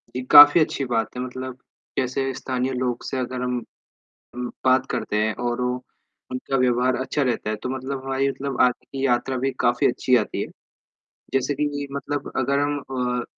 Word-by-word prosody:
ये 130 - -2
काफ़ी 145 +3 +10
अच्छी 140 -2 0
बात 115 -1 -1
है। 125 - -2
मतलब 130 0 -6 0.4
जैसे 135 +1 0
स्थानीय 130 0 -2
लोग 125 -1 -2
से 135 - -3
अगर 125 0 -3
हम 125 -1 -1 0.8
अम, 125 0 -3 0.2
बात 130 0 +4
करते 105 - -2
हैं 110 0 +1
और 120 +1 -1
वो, 125 0 0 0.6
उनका 130 +1 -2
व्यवहार 125 0 +2
अच्छा 130 +3 -1
रहता 120 -4 -1
है 110 - -1
तो 125 - -2
मतलब 130 +1 -4
हमारी 135 +1 +1
मतलब 140 0 -4
आगे 125 -1 +2
की 135 0 -3
यात्रा 130 +1 +1
भी 135 +2 0
काफ़ी 120 +1 +3
अच्छी 125 +1 +2
आती 105 - -2
है। - - -3 0.9
जैसे 135 +2 +1
कि 150 +2 0 0.2
ये 140 - -4
मतलब 140 0 -4
अगर 135 +2 +1
हम 145 0 0
अ, 125 -3 -2
130 Hz, 190 wpm, -23 LUFS, 125-135 Hz, 0.9 s, काफ़ी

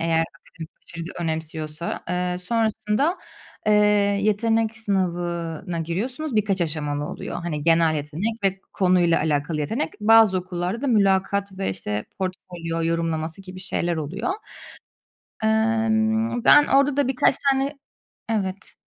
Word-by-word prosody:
eğer 165 0 +2 0.2
akademik 160 -1 -11
başarıyı 170 +1 -8
önemsiyorsa. 160 0 -3
Iıı, 180 0 -1
sonrasında, 225 - 0 0.5
ııı, 210 - +5 0.5
yetenek 225 +1 +1
sınavına 175 -4 -2
giriyorsunuz. 235 - -3
Birkaç 200 -3 +1
aşamalı 150 -3 -1
oluyor. - - -5
Hani, 150 -4 -3
genel 165 -1 +4
yetenek 175 +10 -3
ve 195 0 +1
konuyla 180 -3 +3
alakalı 150 0 0
yetenek. 225 - -1
Bazı 215 -3 +6
okullarda 180 +5 -3
da - - 0
mülakat 200 -3 +2
ve, 195 - -1
işte, 105 +2 -4
portfolyo 175 -3 -4
yorumlaması 165 +1 -2
gibi 185 0 -9
şeyler 175 -2 -1
oluyor. 170 +9 -3 1.1
Emm, 220 +1 +1
ben 295 +2 +7
orada 275 +1 +3
da 285 -3 +3
birkaç 265 0 +3 0.2
tane 275 +2 -1 0.5
Evet. 195 -2 -3
185 Hz, 120 wpm, -23 LUFS, 165-220 Hz, 1.1 s, ben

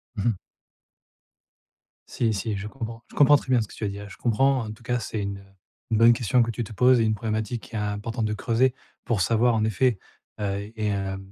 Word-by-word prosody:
Mmh 100 - -3
mh. - - +1 1.8
Si, 115 -2 0
si, 105 0 -2
je 105 +2 -5
comprends. 115 -1 -7
Je - - -16
comprends 145 0 +7
très 135 - -11
bien 125 -2 +4
ce 110 - -4
que - - -14
tu - - -8
as 105 - +1
dit 100 - -4
là. 100 0 -8
Je - - -12
comprends, 130 +2 +2
en 105 - -6
tout 110 +2 -13
cas, 120 +1 0
c'est 110 -1 -4
une 100 0 -5 0.5
une 110 - +3
bonne 115 +1 +7
question 120 +1 +2
que 115 - +1
tu 115 +1 -2
te 110 - -9
poses 125 +2 +5
et 115 - +3
une 110 -1 +2
problématique 110 +1 -3
qui 115 - -11
est - - 0
importante 105 +2 -2
de 105 - -1
creuser, 120 +4 +1 0.3
pour 110 -5 0
savoir 115 +4 +3
en 110 -1 +1
effet, 110 +1 +1 0.4
heu 100 0 -3
et 105 -1 -1
heu, 95 -1 -2
110 Hz, 240 wpm, -25 LUFS, 105-120 Hz, 1.8 s, comprends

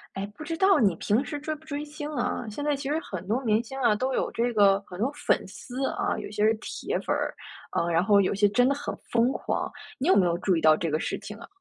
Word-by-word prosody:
哎， 195 - -2
不 310 - -8
知 325 +2 -4
道 385 +1 +5
你 200 -6 +4
平 220 +6 +1
时 290 0 -5
追 310 +1 -3
不 305 - -17
追 295 -1 -4
星 300 0 -6
啊， 245 -2 -2
现 290 +8 -5
在 295 - +2
其 275 0 -5
实 305 +2 +1
很 185 - -7
多 235 +5 +1
明 220 +1 +3
星 265 +3 -7
啊， 235 -5 +3
都 260 +5 -1
有 - - 0
这 240 +1 0
个 200 -2 +5
很 180 - -10
多 240 +5 +1
粉 290 - +1
丝 255 +7 -4
啊， - - -1
有 - - -6
些 210 0 -1
是 220 - +5
铁 220 - -4
粉 - - -1
儿。 - - -2 0.5
嗯， 170 - 0
然 170 +1 +3
后 200 0 +5
有 200 +1 +2
些 205 +1 +4
真 245 +5 +3
的 280 - +2
很 290 - -4 0.2
疯 240 +2 +3
狂。 - - -2 0.3
你 270 - -2
有 - - +6
没 190 - +5
有 170 -1 +1
注 185 -2 +2
意 - - +1
到 155 -1 +6
这 165 0 -2
个 155 - +1
事 - - -2
情 210 +1 -9
啊？ 230 - -11
235 Hz, 300 characters per minute, -27 LUFS, 200-285 Hz, 0.5 s, 有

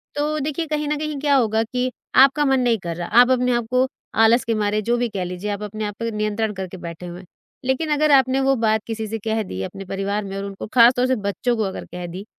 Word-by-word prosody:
तो 300 +1 -1
देखिए 300 +3 -2
कहीं 300 -1 -2
न 300 0 0
कहीं 305 -2 -4
क्या 285 -1 +2
होगा 225 -3 +2
कि 250 +2 -2 0.2
आपका 275 +3 +6
मन 265 -1 +3
नहीं 240 -2 +2
कर 170 -2 -5
रहा, 175 0 -5
आप 245 +3 +6
अपने 250 0 +2
आप 240 - -1
को 255 +1 +3 0.4
आलस 230 +2 +5
के 230 - 0
मारे 210 0 0
जो 235 +3 0
भी 240 -1 0
कह 195 -4 -3
लीजिए, 180 +3 -5
आप 205 +1 -4
अपने 215 +1 -4
आप 205 0 -5
पे 230 0 -2
नियंत्रण 215 0 -1
करके 190 -1 -6
बैठे 170 0 -8
हुए 175 +1 -8
हैं। 190 - -13 0.4
लेकिन 265 +5 0
अगर 300 0 +2
आपने 265 -1 +4
वो 270 0 +3
बात 220 -1 +2
किसी 220 -1 -4
से 225 +2 -3
कह 220 0 +1
दी 95 - -6
अपने 195 - -7
परिवार 200 +2 -2
में 195 0 -6
और 195 - -4
उनको 200 +1 -7
खास 240 0 +7
तौर 250 +1 +2
से 260 - +2
बच्चों 220 +5 0
को 220 - +1
अगर 190 -2 -4
कह 180 0 -5
दी 185 +4 -8
225 Hz, 265 wpm, -21 LUFS, 200-260 Hz, 0.4 s, खास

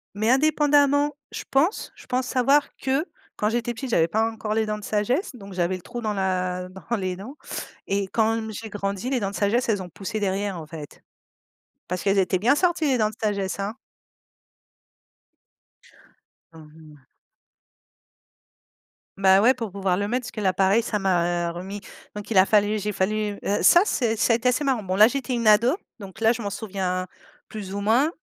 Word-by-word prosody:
Mais 215 +3 0
indépendamment, 290 0 +3 0.2
je - - -6
pense 305 +9 +1
je - - -15
pense 255 0 -1
savoir 275 +3 +3
que 270 +4 0 0.3
quand 210 - 0
j'étais 240 +1 -1
petite, 255 +3 -6
j'avais 165 -8 +3
pas 220 +6 +1
encore 215 -1 -4
les 220 0 0
dents 210 0 -2
de 210 - -11
sagesse, 245 - -1
donc 200 -4 -11
j'avais 180 0 0
le 185 - -9
trou 240 +6 -7
dans 215 -2 -1
la 185 -2 -1
dans 190 +5 -4
les 185 -4 -2
dents 215 +10 -9 0.5
et 195 0 0
quand, 225 +1 +2
mmh, 220 0 -6
j'ai 220 +2 -7
grandi, 200 +2 -3
les 265 -2 0
dents 195 -3 -2
de - - -9
sagesse, 230 +5 +1
elles 205 -3 +1
ont 180 - -8
poussé 205 +5 -5
derrière, 195 -2 -2
en 155 - -9
fait 155 -2 -10 0.9
parce 180 0 -3
qu'elles 195 0 +2
étaient 185 -1 +1
bien 240 +8 +4
sorties 345 -1 +1
les 265 -3 +2
dents 215 -2 +2
de 215 - -12
sagesse, 200 -3 -1
hein. 200 +2 -2 2.8
Mmh 160 -2 -14 0.2
mh. 145 -2 -20 2.1
Bah, 190 0 +5
ouais, 245 +4 +5
pour 230 -6 -5
pouvoir 195 -2 0
le 205 +2 -1
mettre 250 +4 -1
parce - - -7
que 215 - -6
l'appareil 195 +3 +3
ça 220 -2 -2
m'a, 175 -3 +1
heu, - - -4
remis 190 +4 -7 0.3
donc 210 +2 -8
il 205 - +2
a 185 - +5
fallu 210 0 +3
j'ai 210 +1 -2
fallu 205 +1 -1 0.2
ça 345 - +7
c'est 235 - 0
ça 230 +2 +2
a - - +5
été 240 +2 +1
assez 250 +4 0
marrant. 265 -5 +1
Bon, 185 -2 -3
là, 210 +2 +8
j'étais 260 +1 -3
une 235 -1 -2
ado, 230 - +5 0.2
donc 200 +1 -10
là, 225 0 +4
je 240 0 -3
m'en 205 - -3
souviens 190 -3 -3 0.4
plus 200 -3 -7
ou - - -2
moins. 235 +9 +3
210 Hz, 200 wpm, -24 LUFS, 190-240 Hz, 2.8 s, là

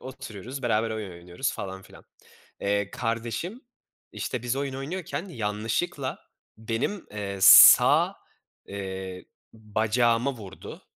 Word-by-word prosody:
oturuyoruz, 125 0 -8
beraber 115 -1 0
oyun 110 -3 -5
oynuyoruz 90 +9 -4
falan 95 0 -7
filan. - - -16 0.6
Eee, 100 0 -1
kardeşim 115 - -4 0.5
işte, 125 -2 -4
biz 125 +2 -2
oyun 140 -1 -3
oynuyorken 155 +3 -5
yanlışlıkla 115 - -3 0.4
benim, 115 - -3
eee, 100 -2 -5
sağ, 95 - +8 0.5
eee, 95 -2 -6 0.3
bacağıma 115 +4 0
vurdu. 100 -5 -11
115 Hz, 105 wpm, -26 LUFS, 100-130 Hz, 0.6 s, sağ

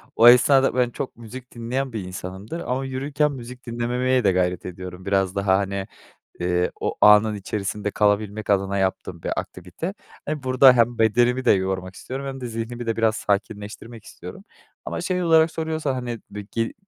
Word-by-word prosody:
o 115 - +7
esnada 130 +2 +6
ben 125 -1 +2
çok 130 - -6
müzik 120 +2 -10
dinleyen 125 +2 -3
bir 110 - -3
insanımdır 95 - -7
ama 135 -4 -2
yürürken 140 +3 -1
müzik 125 -1 -9
dinlememeye 125 +2 0
de 95 - +4
gayret 90 -1 0
ediyorum. 90 +1 -8
Biraz 95 -1 +1
daha, 100 -1 +3
hani, 100 0 -2 0.5
eee, 90 0 0
o - - -1
anın 105 +1 +6
içerisinde 105 +1 -3
kalabilmek 105 0 0
adına 100 0 +1
yaptığım 95 -3 -2
bir - - -2
aktivite. 90 - -6 0.3
Eee, 150 -2 -3
burada 130 0 +6
hem 120 0 +2
bedenimi 120 +3 +3
de - - +6
yormak 95 -1 -1
istiyorum 135 +2 -6
hem 135 -1 -6
de 125 - -4
zihnimi 115 +1 -5
de 115 - -1
biraz 110 -1 +2
sakinleştirmek 105 +2 -3
istiyorum 90 - -10 0.4
ama - - -4
şey 180 0 -1
olarak 160 -1 +4
soruyorsan, 160 -4 -2
hani, 120 -3 -4
be 105 - -6
gi 115 0 -1
115 Hz, 170 wpm, -23 LUFS, 100-130 Hz, 0.5 s, o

